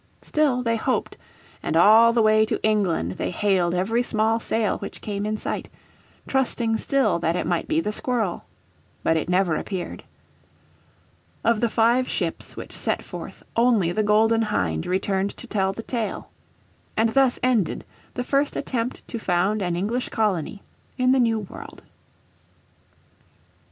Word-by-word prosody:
Still 280 -5 +1
they 230 -1 +1
hoped, - - -1 0.5
and 160 - 0
all 220 +6 +7
the 230 -1 +2
way 215 0 +5
to - - -1
England 195 - +1
they - - -1
hailed 185 -2 +1
every 220 +7 +1
small 225 -1 +1
sail 220 -2 0
which - - -7
came 205 0 -3
in 215 0 -1
sight, - - -4 0.6
trusting 235 -4 0
still 275 -10 +1
that 165 0 0
it - - -1
might 175 -1 -1
be 320 0 +1
the 270 - -1
Squirrel. 220 -4 -1 0.6
But 165 - +2
it 160 +1 -1
never 180 -3 +2
appeared. 185 0 -5 1.4
Of 230 -2 +3
the 235 0 +1
five 235 +3 +2
ships - - -3
which - - -8
set - - -2
forth - - -9
only 230 -7 +3
the 215 - 0
Golden 220 +2 +3
Hind 80 - -1
returned 195 +1 -1
to - - -9
tell 195 -5 0
the 225 +3 -7
tale. 230 -3 -4 0.7
And 225 +1 +3
thus 260 +1 +3
ended 240 -8 +1 0.3
the 250 - -2
first 280 +3 0
attempt 245 -1 -3
to 235 - -5
found 195 +2 +1
an 175 -2 -1
English 220 +8 -2
colony 200 -3 -1 0.3
in 255 -1 +3
the 265 - +4
New 230 -2 +3
World. 195 - -10
215 Hz, 155 wpm, -24 LUFS, 190-235 Hz, 1.4 s, all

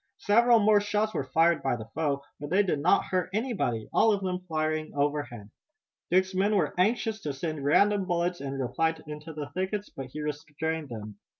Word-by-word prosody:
Several 235 +3 +5
more 210 -1 +4
shots 210 +1 0
were 135 - -2
fired 165 +3 +4
by 135 - 0
the 110 -2 -7
foe, 140 -3 -1 0.2
but 145 0 -6
they 190 +5 +4
did 175 -7 0
not 165 +6 +3
hurt 185 -1 -1
anybody, 210 - -1
all 225 - +5
of 200 -2 0
them 180 -1 -1
flying 155 -1 -1
overhead. 145 -7 -2 0.6
Dick's 190 +1 +2
men 200 +3 +2
were 195 - +1
anxious 220 +3 +1
to 145 -5 -3
send 155 +1 -4
random 200 +7 +3
bullets 175 -1 -1
in 140 -1 -4
reply 160 +5 0
into 150 +1 -8
the 150 -2 -6
thickets, 190 +5 -3
but 135 -1 -7
he 150 +4 -7
restrained 150 +1 -4
them. 105 -3 -8
160 Hz, 190 wpm, -28 LUFS, 145-195 Hz, 0.6 s, Several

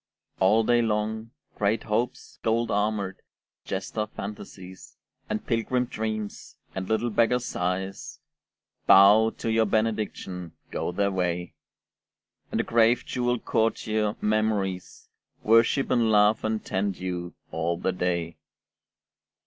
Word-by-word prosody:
All 105 +4 +4
day 120 +1 +3
long 110 0 -1 0.2
Great 105 +2 0
Hopes 115 +3 -3
gold 115 +1 0
armoured, 105 -2 -1 0.4
jester 105 +3 -3
Fantasies, 95 -3 -9 0.3
And 110 - -3
pilgrim 125 +2 0
Dreams, 110 -3 -5 0.2
and 95 0 -5
little 110 +2 +1
beggar 115 +3 +3
Sighs, 95 -5 -3 0.7
Bow 105 +3 +7
to 115 - -2
your 110 -1 +3
benediction, 105 -5 -2 0.2
go - - -2
their 100 +2 0
way. 90 -3 -2 1.0
And - - -2
the - - +2
grave 115 +1 +3
jewelled 125 -1 -1
courtier 110 -1 0
Memories 105 -3 -1 0.4
Worship 115 +5 +4
and 115 -2 +3
love 105 0 +4
and 110 0 -2
tend 95 0 -1
you, 90 -1 -5 0.2
all 85 +1 -1
the 95 - -1
day. 85 -2 -2
105 Hz, 115 wpm, -26 LUFS, 95-110 Hz, 1.0 s, Bow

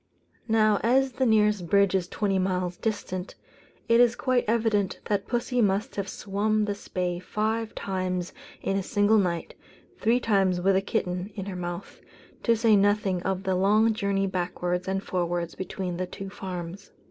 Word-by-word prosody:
Now, 215 -2 +3
as 260 +3 +3
the 255 +1 0
nearest 210 -4 +3
bridge 200 +1 +4
is 185 -2 +1
twenty 195 -1 0
miles 180 -1 -1
distant, 185 -3 -4 0.5
it 230 0 +5
is 240 -1 +4
quite 255 -1 +1
evident 220 -3 +1
that 200 -1 -1
pussy 245 0 0
must 205 +4 +1
have 200 -1 -3
swum 215 +1 0
the 205 - -1
Spey 180 -3 -3
five 220 +4 -2
times 185 -2 -3 0.3
in 195 - 0
a - - 0
single 205 +2 +3
night 175 -4 -1 0.5
(three 230 +3 +3
times 195 -6 +2
with 190 +2 +3
a 190 - +3
kitten 185 -2 -2
in 195 -3 -5
her 195 -2 -5
mouth), 175 -1 -6 0.4
to 230 - +3
say 225 -1 +4
nothing 200 -2 +2
of 190 +1 -2
the 190 -1 0
long 210 +4 +3
journeys 200 -2 0
backwards 180 0 -2
and 195 0 -1
forwards 175 -2 -2
between 185 -1 -4
the 185 0 -2
two 195 +1 -8
farms. 185 -1 -7
195 Hz, 170 wpm, -26 LUFS, 185-215 Hz, 0.5 s, it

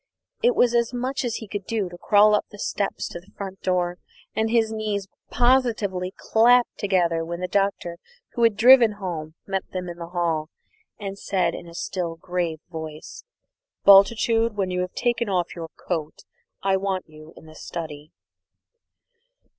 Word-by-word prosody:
It 485 0 +3
was 240 -1 +4
as 235 +1 +1
much 260 +3 -2
as 240 -2 -2
he 220 - -6
could 200 -1 -5
do 220 -4 -1
to 175 - -10
crawl 205 +4 +5
up 210 - +1
the 205 - -12
steps 200 0 -2
to - - -7
the 185 +4 -21
front 195 -1 -7
door, 180 -1 0 0.4
and 220 0 +1
his 225 -1 +2
knees 210 -3 -2 0.2
positively 225 -7 +1
clapped 240 +2 +4
together 175 -5 +1
when 170 +1 -5
the 180 - -2
Doctor, 195 -3 -1 0.3
who 235 - -4
had 230 -3 +4
driven 235 -1 +7
home, 170 -6 -6
met 195 -1 -1
them 180 -1 -3
in 175 0 -7
the 170 - -6
hall 165 -3 -1 0.5
and 195 -1 -6
said 185 -4 0
in 170 - -8
a 170 - -12
still 175 -2 -3
grave 170 -2 -3
voice, 160 - -8 0.6
"Bultitude, 225 +3 +5
when 190 -2 0
you 180 0 0
have 180 0 -5
taken 240 -2 0
off 180 -3 -1
your 165 -2 -6
coat, 160 -4 -4 0.4
I 195 -1 +3
want 190 -1 -2
you 155 +1 -14
in - - -14
the 155 - -13
study." 155 -2 -7
195 Hz, 170 wpm, -24 LUFS, 175-220 Hz, 0.6 s, driven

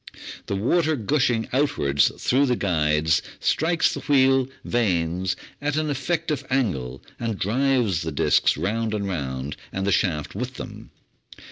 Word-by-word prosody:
The 100 - -1
water 155 - +2
gushing 120 -2 +1
outwards 70 - +2
through 135 +3 +2
the 125 - +2
guides 80 -5 +1 0.2
strikes 165 +2 +2
the - - -4
wheel 135 -2 +3 0.2
vanes 90 -5 0 0.3
at 145 0 -1
an 155 -1 0
effective 150 0 -1
angle 70 - -1 0.2
and 115 -3 -2
drives 120 - +1
the 80 - -3
disks 70 - +2
round 110 +6 -1
and 100 -1 -2
round, 70 -5 -4
and 95 0 -3
the 100 - +1
shaft 80 -5 0
with 125 +5 -4
them. - - -9
110 Hz, 140 wpm, -24 LUFS, 85-135 Hz, 0.3 s, wheel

